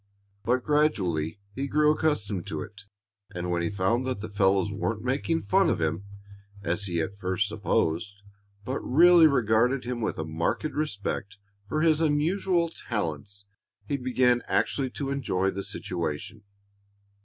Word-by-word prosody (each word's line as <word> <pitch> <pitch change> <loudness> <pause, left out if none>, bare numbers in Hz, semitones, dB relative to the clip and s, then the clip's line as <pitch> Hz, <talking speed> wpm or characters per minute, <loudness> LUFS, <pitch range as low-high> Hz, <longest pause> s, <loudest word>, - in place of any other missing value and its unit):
But 125 +2 +1
gradually 100 - +1
he 135 +5 -3
grew 150 +1 +4
accustomed 105 - -1
to 80 -1 -3
it, 105 -1 -12 0.5
and 90 0 -3
when 85 -1 0
he 85 - 0
found 105 +6 0
that 130 -6 -2
the 105 0 -7
fellows 100 0 +2
weren't 105 +2 -2
making 140 +6 0
fun 100 - +3
of - - 0
him, 80 +5 -1 0.6
as 90 +4 -1
he 85 -3 -1
at 100 +5 -5
first 95 +2 0
supposed, 100 -1 -1 0.4
but 130 +2 -2
really 170 +4 +6
regarded 125 -1 +2
him 120 -1 -3
with 110 - -2
a 80 - -3
marked 80 +1 -1
respect 105 -9 -3 0.3
for 155 - 0
his 160 -1 +3
unusual 170 +3 +2
talents, 100 - -4 0.4
he 145 - -1
began 125 -2 +2
actually 135 -2 0
to 135 +2 -4
enjoy 95 -9 0
the 100 +1 -4
situation. 95 +1 -5
105 Hz, 150 wpm, -27 LUFS, 95-140 Hz, 0.6 s, really